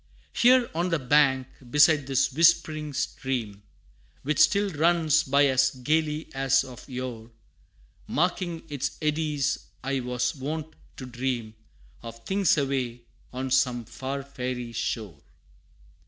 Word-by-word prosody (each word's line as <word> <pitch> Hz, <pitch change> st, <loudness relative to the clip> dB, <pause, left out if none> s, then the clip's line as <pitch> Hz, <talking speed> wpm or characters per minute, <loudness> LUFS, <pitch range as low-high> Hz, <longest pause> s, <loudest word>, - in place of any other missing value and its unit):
Here, 250 Hz, 0 st, +5 dB
on 170 Hz, +3 st, -1 dB
the 165 Hz, -, +1 dB
bank, 135 Hz, -1 st, +3 dB, 0.2 s
beside 150 Hz, 0 st, +4 dB
this 135 Hz, 0 st, +1 dB
whispering 155 Hz, -1 st, +3 dB
stream, 130 Hz, -7 st, -3 dB, 0.6 s
Which 150 Hz, +1 st, -1 dB
still 200 Hz, -1 st, +4 dB
runs 160 Hz, -1 st, +3 dB
by 140 Hz, +1 st, +3 dB
as 130 Hz, -1 st, +3 dB
gayly 150 Hz, +4 st, -1 dB
as 135 Hz, 0 st, +2 dB
of 130 Hz, 0 st, -12 dB
yore, 125 Hz, -3 st, -6 dB, 0.8 s
Marking 175 Hz, 0 st, -1 dB
its 145 Hz, -4 st, -4 dB
eddies, 150 Hz, -2 st, 0 dB, 0.2 s
I 135 Hz, 0 st, -1 dB
was 125 Hz, -1 st, -1 dB
wont 155 Hz, +3 st, -5 dB, 0.2 s
to 130 Hz, -, -7 dB
dream 120 Hz, -3 st, -3 dB, 0.5 s
Of 115 Hz, 0 st, -10 dB
things 195 Hz, -4 st, +2 dB
away, 130 Hz, -4 st, -1 dB, 0.3 s
on 130 Hz, +1 st, -4 dB
some 125 Hz, -3 st, +2 dB
far 135 Hz, +4 st, -5 dB
fairy 125 Hz, -3 st, -5 dB
shore. 110 Hz, -7 st, -4 dB
135 Hz, 125 wpm, -26 LUFS, 125-155 Hz, 0.8 s, Here